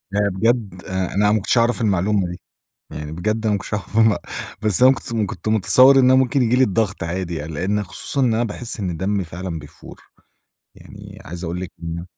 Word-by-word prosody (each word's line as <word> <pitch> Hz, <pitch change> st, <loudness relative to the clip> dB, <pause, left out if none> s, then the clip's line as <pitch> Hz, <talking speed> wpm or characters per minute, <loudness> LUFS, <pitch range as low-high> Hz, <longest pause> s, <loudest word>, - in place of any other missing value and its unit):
أنا 100 Hz, 0 st, +2 dB
بجد 100 Hz, -2 st, -1 dB
آآ 95 Hz, -1 st, -3 dB
أنا 105 Hz, +1 st, +3 dB
ما 110 Hz, -, +3 dB
كنتش 110 Hz, +4 st, 0 dB
أعرف 120 Hz, +1 st, +2 dB
المعلومة 100 Hz, -2 st, +1 dB
دي، 90 Hz, -, -8 dB, 0.5 s
يعني 75 Hz, 0 st, -6 dB
بجد 110 Hz, +7 st, -2 dB
أنا 110 Hz, -, +2 dB
ما 100 Hz, -, +1 dB
كنتش 100 Hz, -, -6 dB
أعرف 105 Hz, +1 st, -3 dB
المع 110 Hz, -2 st, +4 dB, 0.4 s
بس 105 Hz, +2 st, +4 dB
أنا 130 Hz, +1 st, +7 dB
س 115 Hz, -, -6 dB
كنت 110 Hz, -3 st, -1 dB
كنت 90 Hz, +4 st, -6 dB
متصور 130 Hz, +5 st, +5 dB
إن 130 Hz, -, +5 dB
أنا 130 Hz, +1 st, +5 dB
ممكن 130 Hz, +1 st, +2 dB
ييجي 120 Hz, +1 st, +2 dB
لي 130 Hz, -, +5 dB
الضغط 105 Hz, -4 st, -1 dB
عادي 85 Hz, +1 st, -3 dB
يعني، 80 Hz, 0 st, -6 dB
لإن 100 Hz, +7 st, -1 dB
خصوصًا 105 Hz, +8 st, -4 dB
إن 125 Hz, -4 st, +2 dB
أنا 115 Hz, +2 st, +1 dB
باحِسّ 115 Hz, +1 st, -4 dB
إن 90 Hz, -4 st, -3 dB
دمّي 95 Hz, +3 st, -1 dB
فعلًا 85 Hz, +1 st, -6 dB
بيفُور، 75 Hz, -1 st, -13 dB, 0.7 s
يعني -, -, -13 dB
عايز 85 Hz, +3 st, -7 dB
أقول 85 Hz, +1 st, -4 dB
لِك 95 Hz, -, -6 dB
إن 85 Hz, +1 st, -5 dB
100 Hz, 215 wpm, -20 LUFS, 90-115 Hz, 0.7 s, أنا